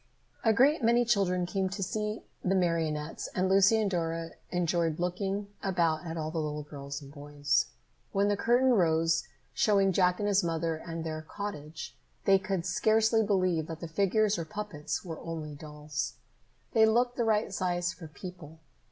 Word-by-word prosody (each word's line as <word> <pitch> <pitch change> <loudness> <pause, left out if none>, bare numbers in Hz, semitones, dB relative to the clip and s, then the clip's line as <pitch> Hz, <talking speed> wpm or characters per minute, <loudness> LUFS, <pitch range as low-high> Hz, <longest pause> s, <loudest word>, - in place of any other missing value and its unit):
A 225 - +5
great 270 +6 +4
many 235 +1 +4
children 190 -6 +2
came 190 +1 -1
to 195 +1 -3
see 210 +3 -3 0.2
the 190 +1 +2
marionettes 165 -4 -1
and 185 0 +2
Lucy 195 +3 +5
and 210 -3 0
Dora 165 -1 -2 0.2
enjoyed 170 -2 0
looking 195 +3 -2
about 170 -3 0
at 165 0 -4
all 155 -1 -3
the 165 - -2
little 150 -1 -3
girls 140 -1 -7
and 140 0 -12
boys. 145 -1 0 0.4
When 200 +1 +2
the 205 - +2
curtain 245 +5 +3
rose, 165 -4 +2 0.3
showing 200 -6 +3
Jack 180 0 +3
and 205 - -1
his 200 0 +3
mother 165 -1 -1
and 165 +1 -6
their 155 -1 -4
cottage, 155 -3 -7 0.3
they 195 -1 +6
could 190 -3 -2
scarcely 220 +4 +3
believe 185 -6 +1
that 165 -1 -6
the 170 - -5
figures, 200 +4 +2
or - - -1
puppets, 205 -6 -4
were 165 -3 -6
only 160 -2 -5
dolls. 150 0 -5 0.6
They 220 -2 +6
looked 245 +2 +2
the 240 - 0
right 215 -3 +1
size 175 -1 0
for 170 -3 -10
people. 160 0 -10
180 Hz, 170 wpm, -30 LUFS, 160-205 Hz, 0.6 s, they